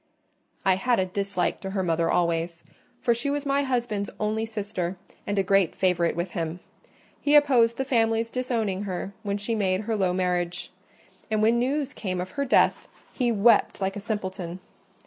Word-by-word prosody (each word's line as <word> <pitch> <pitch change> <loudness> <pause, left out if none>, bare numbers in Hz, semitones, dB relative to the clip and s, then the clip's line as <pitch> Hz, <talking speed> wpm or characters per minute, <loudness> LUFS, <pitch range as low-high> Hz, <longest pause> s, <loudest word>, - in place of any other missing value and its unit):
"I 190 -1 +4
had 240 +3 +2
a 190 - +2
dislike 195 -1 -2
to 195 - -4
her 190 -1 -1
mother 165 -1 +1
always; 170 -1 0 0.4
for 240 -2 +3
she 240 +5 -2
was 290 0 -2
my 280 0 +2
husband's 240 -7 -1
only 215 +1 -1
sister, 200 -4 -3 0.3
and 205 - -1
a 195 - +3
great 195 -2 +2
favourite 175 -3 +1
with 175 +2 -3
him: 165 -1 -3 0.6
he 295 +1 +3
opposed 250 -6 +5
the 265 - -1
family's 225 -2 +1
disowning 225 -6 -1
her 190 +1 -4
when 200 -2 -2
she 205 +3 -3
made 190 -3 +1
her 220 +1 -2
low 190 -3 +1
marriage; 180 -1 -1 0.6
and 215 -1 +1
when 230 +2 +4
news 275 +2 -1
came 185 -3 -3
of 180 +1 -4
her 280 -1 -2
death, 260 - +3 0.3
he 245 -3 +1
wept 225 0 +4
like 195 0 -1
a - - -4
simpleton. 190 -4 -4
205 Hz, 180 wpm, -26 LUFS, 185-235 Hz, 0.6 s, opposed